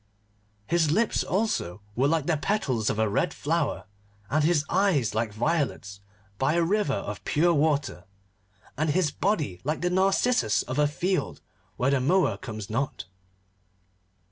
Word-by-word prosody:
His 165 +1 +2
lips, 215 +8 +1
also, 180 - -1 0.2
were 130 +3 +2
like 160 -1 +1
the 165 - +1
petals 140 - 0
of - - -1
a 110 0 +2
red 140 - 0
flower, 160 0 -1 0.5
and 155 +1 +2
his 155 -2 +2
eyes 170 - +1
were 110 - 0
like 115 -2 -2
violets 115 -5 -2 0.4
by 135 +4 +2
a 170 - +3
river 190 -5 +1
of 105 0 -5
pure 170 +3 +2
water, 145 - 0 0.7
and 155 +3 0
his 160 -1 +1
body 150 - -1
like 150 +3 -2
the 180 0 0
narcissus 190 - +2
of 130 +3 -3
a 150 - +4
field 180 +5 -2 0.4
where 130 +2 +1
the 140 -2 +2
mower 180 +8 +2
comes 110 -6 -7
not. 115 -4 -3
150 Hz, 155 wpm, -26 LUFS, 125-175 Hz, 0.7 s, a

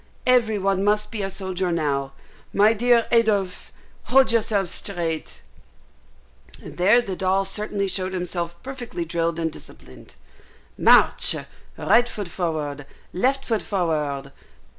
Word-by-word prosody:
Every 235 -4 +3
one 195 0 0
must 210 +2 +1
be 220 -3 -4
a 195 - -2
soldier 190 -2 -3
now. 140 -4 -1 0.4
My 210 +2 +5
dear 235 +1 +3
Adolphe, 210 -5 +1 0.3
hold 265 -1 +4
yourself 210 -4 +1
straight" 170 -5 -4 1.2
(and - - -11
there 210 +7 +4
the 195 -5 -4
doll 190 +1 +1
certainly 200 0 -2
showed 185 0 -1
himself 175 -1 -3
perfectly 245 -9 -6
drilled 170 0 -1
and 165 -1 -1
disciplined). - - -14 0.6
"March - - +4 0.4
right 235 +4 +3
foot 205 -6 -6
forward 150 -5 -3 0.3
left 270 +8 0
foot 225 -3 0
forward." 150 -7 -2
195 Hz, 125 wpm, -23 LUFS, 170-220 Hz, 1.2 s, My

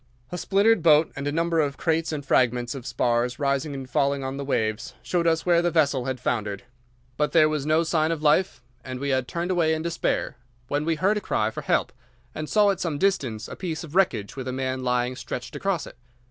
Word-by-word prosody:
A 180 - -3
splintered 205 +1 +3
boat 155 -1 +5
and 140 0 -4
a - - 0
number 165 +1 +1
of 145 -2 0
crates 165 0 0
and 145 -3 -4
fragments 125 -1 +2
of 130 -3 -7
spars 120 0 0
rising 140 +1 -1
and 135 -1 -6
falling 140 +2 0
on 135 0 -3
the 140 - -4
waves 110 -5 -2
showed 170 -2 0
us 165 0 +1
where 170 -1 +4
the 175 - +1
vessel 145 -6 +2
had 130 -1 -3
foundered; 105 -5 -2 0.5
but 150 0 0
there 155 -2 +6
was 150 -2 -2
no 155 +2 +3
sign 160 -1 +1
of 160 -2 -3
life, 150 -5 +2 0.2
and 130 -1 -6
we 140 +1 -2
had 130 -2 0
turned 175 +2 -2
away 165 -3 +2
in 160 - -4
despair 170 -6 -1 0.3
when 145 +1 -1
we 165 0 +1
heard 195 +6 +2
a - - -2
cry 110 - 0
for - - -6
help, - - 0 0.4
and 155 0 -5
saw 210 -2 +4
at 190 - -4
some 165 -6 -2
distance 140 - 0
a - - -8
piece 170 -3 -4
of 160 -2 -10
wreckage 170 - +1
with 130 -1 -6
a - - -2
man 130 0 -2
lying 125 0 0
stretched 125 -1 -6
across 195 -5 -1
it. - - -13
150 Hz, 230 wpm, -25 LUFS, 130-165 Hz, 0.5 s, there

